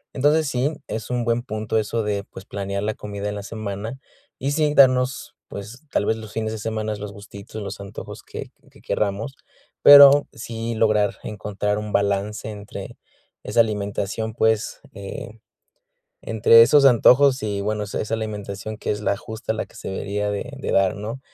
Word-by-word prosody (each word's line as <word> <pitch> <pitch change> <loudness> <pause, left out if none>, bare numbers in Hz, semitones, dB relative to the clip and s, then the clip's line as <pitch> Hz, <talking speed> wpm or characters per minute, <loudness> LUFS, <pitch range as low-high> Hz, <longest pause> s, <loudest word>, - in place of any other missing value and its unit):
Entonces 150 +3 +3
sí, 135 +3 0 0.2
es 110 +2 -5
un 125 -1 -1
buen 115 0 +1
punto 110 -3 -3
eso 110 +1 -1
de, 100 -1 -2
pues, 95 -1 -12
planear 100 0 -4
la 110 - -1
comida 100 -1 -6
en 105 - -4
la 100 - -6
semana 110 +3 -5 0.4
y, 135 +2 -1
sí, 150 0 +1
darnos, 130 -1 +3
pues, 105 +6 -8
tal - - +1
vez, 110 - +1
los 110 -2 -9
fines 110 -1 -2
de 110 - -5
semanas, 110 -1 -3
los 105 -1 -6
gustitos, 100 +1 -10
los 100 0 -6
antojos 100 +1 -8
que - - -8 0.2
que - - -19
querramos, 105 +7 -2 0.5
pero 145 0 +9
sí 115 0 -5
lograr 110 -2 +2
encontrar 105 0 -3
un 105 0 -6
balance 100 +2 0
entre 105 -1 -8 0.5
esa - - -1
alimentación, 105 0 -2
pues, 110 -1 0
eh, 100 +3 -8 0.8
entre 115 +1 +6
esos 140 +4 +5
antojos 135 +2 +6
y, 100 -2 -2
bueno, 105 0 -1
esa 100 - -4
esa 110 - -6
alimentación 105 -1 -5
que - - -4
es 105 0 -1
la 100 - 0
justa 110 +2 -5
la 110 - -2
que - - -19
se - - -7
debería 100 +2 -2
de 100 - -4
de - - -3
dar, 95 -1 +3
¿no? 110 +5 -6
110 Hz, 175 wpm, -23 LUFS, 100-115 Hz, 0.8 s, pero